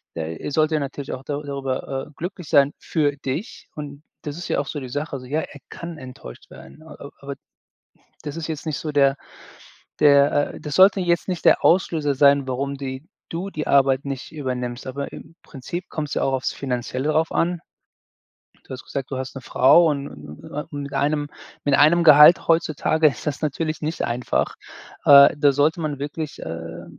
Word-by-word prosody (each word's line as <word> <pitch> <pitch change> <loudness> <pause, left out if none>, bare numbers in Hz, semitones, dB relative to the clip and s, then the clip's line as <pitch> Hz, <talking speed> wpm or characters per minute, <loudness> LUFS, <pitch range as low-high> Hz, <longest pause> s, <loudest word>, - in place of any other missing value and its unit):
äh, 80 0 -4
er - - -6
sollte 155 +1 +2
natürlich 140 0 -5
auch 130 - -7
da 145 0 -3
darüber, 135 -1 -4
äh, - - -17
glücklich 180 -2 -6
sein 140 0 +4
für 145 -3 -1
dich 145 - -6
und 145 0 -8 0.2
das 150 +1 -6
ist 175 - -6
ja - - +1
auch 140 - -3
so 150 - -4
die 130 - -6
Sache. 145 +4 -4
Also, 130 -2 -5
ja, 150 +4 -1
er 145 - -10
kann 170 -1 -8
enttäuscht 130 - -11
werden, 155 - -14
a 160 - -12
a 140 - -10
aber 140 0 -6 0.9
das 145 +2 -6
ist 165 -1 -5
jetzt 160 0 -5
nicht 155 - -2
so 155 - -4
der 140 -1 +4 0.9
der, 145 0 +4
äh - - -10
das 150 -2 -6
sollte 195 +1 +6
jetzt 175 0 0
nicht 180 -2 -3
der - - +4
Auslöser 160 -5 +2
sein, 140 -1 +4
warum 140 +2 -2
die 135 +1 -6 0.3
du 180 +4 -4
die 155 -4 -5
Arbeit 135 -1 +3
nicht 135 +1 -6
übernimmst, 125 -5 -4
aber 140 +2 -5
im 165 - -12
Prinzip 170 +6 -7
kommt's 150 -2 -4
ja - - -1
auch 135 - +1
aufs 130 - -1
Finanzielle 130 +2 -3
drauf 160 +1 +1
an. 175 0 0 1.1
Du - - -27
hast 130 - -8
gesagt, 135 0 -5
du 130 - -3
hast 130 +1 -6
'ne 135 - -7
Frau 145 +9 +5
und 140 -1 -2
und 75 +1 -11
und - - -12 0.2
und 145 0 -5
mit 140 - -8
einem 145 0 0 0.4
mit 145 -1 +3
einem 170 +4 +5
Gehalt 150 +2 +8
heutzutage 160 -1 +2
ist 140 +1 -3
das 145 0 -3
natürlich 155 +2 -2
nicht 155 +2 -3
einfach. 120 +1 -1 0.5
Äh, 140 0 +8
da 145 -1 +4
sollte 150 +4 +1
man 150 -3 -3
wirklich, 150 +1 -5
äh, 85 +1 -7
145 Hz, 200 wpm, -22 LUFS, 135-155 Hz, 1.1 s, Gehalt